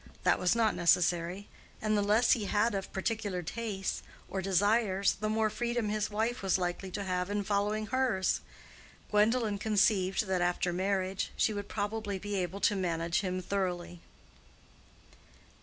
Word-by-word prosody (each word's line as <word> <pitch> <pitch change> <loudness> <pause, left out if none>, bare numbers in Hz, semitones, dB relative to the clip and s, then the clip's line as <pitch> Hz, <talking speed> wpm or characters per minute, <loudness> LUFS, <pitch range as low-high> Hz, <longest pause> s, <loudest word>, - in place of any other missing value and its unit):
That - - +3
was 180 +4 +2
not 225 -2 +3
necessary: 175 +3 +2 0.3
and 215 0 0
the 205 - +2
less 215 +4 +3
he 220 -5 +3
had 210 +3 +1
of 195 -1 -4
particular 200 -2 -2
tastes, 205 0 -3 0.3
or 190 - -3
desires, 200 +1 +2
the 215 0 -1
more 215 0 +1
freedom 235 -1 -1
his 215 0 -1
wife 220 +3 -1
was 190 -1 +2
likely 180 +1 -3
to 200 +2 -4
have 180 -1 -1
in 205 0 -1
following 210 +1 0
hers. 250 -6 +1 0.7
Gwendolen 210 0 +2
conceived 205 -2 +2
that 190 -2 0
after 175 0 0
marriage 190 +1 -1
she 220 - +2
would 205 -1 -4
most - - -22
probably 205 -1 -2
be 205 +2 -5
able 190 0 -2
to 210 - +3
manage 170 -2 0
him 185 -1 -2
thoroughly. 175 -3 -3
200 Hz, 155 wpm, -31 LUFS, 185-215 Hz, 0.7 s, That